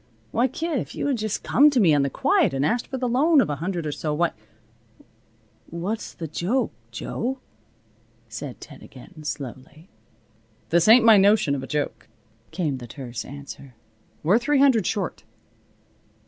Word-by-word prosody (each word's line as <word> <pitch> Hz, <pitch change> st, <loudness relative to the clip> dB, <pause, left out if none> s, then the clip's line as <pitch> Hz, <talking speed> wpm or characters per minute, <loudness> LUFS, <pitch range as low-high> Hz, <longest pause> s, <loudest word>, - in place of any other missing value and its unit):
Why, 240 Hz, +3 st, +2 dB
kid, 315 Hz, +2 st, -2 dB
if -, -, -7 dB
you -, -, -3 dB
had 275 Hz, -5 st, 0 dB
just 215 Hz, -1 st, -3 dB
come 290 Hz, +5 st, +5 dB
to 275 Hz, -4 st, +1 dB
me 175 Hz, -8 st, +5 dB
on 145 Hz, -, +3 dB
the 140 Hz, -, 0 dB
quiet 135 Hz, -, +2 dB
and 135 Hz, +2 st, 0 dB
asked 235 Hz, +10 st, 0 dB
for 265 Hz, -, -4 dB
the 255 Hz, -1 st, -1 dB
loan 290 Hz, +6 st, +4 dB
of 215 Hz, -, +2 dB
a 145 Hz, -, -3 dB
hundred 170 Hz, +1 st, -3 dB
or 150 Hz, -, -2 dB
so 150 Hz, +1 st, -3 dB
why 170 Hz, +2 st, +1 dB, 0.7 s
" 110 Hz, -1 st, -37 dB, 0.2 s
"What's 215 Hz, +4 st, -4 dB
the 165 Hz, -, -6 dB
joke, 205 Hz, -, -1 dB, 0.2 s
Jo?" 235 Hz, -, -4 dB, 0.9 s
said 115 Hz, +4 st, -7 dB
Ted 145 Hz, -4 st, -12 dB
again, 155 Hz, +5 st, -14 dB
slowly. 145 Hz, +3 st, -7 dB, 0.8 s
"This 170 Hz, +2 st, +3 dB
ain't 230 Hz, +1 st, +7 dB
my 225 Hz, -2 st, +8 dB
notion 200 Hz, -6 st, +4 dB
of 140 Hz, -, -2 dB
a 135 Hz, -, -7 dB
joke," 150 Hz, -1 st, -3 dB, 0.4 s
came 155 Hz, -7 st, -2 dB
the 120 Hz, -, -9 dB
terse 120 Hz, -2 st, -7 dB
answer. 140 Hz, -2 st, -10 dB, 0.5 s
"We're 190 Hz, +9 st, +4 dB
three 290 Hz, +4 st, +1 dB
hundred 265 Hz, -8 st, +4 dB
short." 200 Hz, -5 st, -3 dB
170 Hz, 175 wpm, -24 LUFS, 140-235 Hz, 0.9 s, my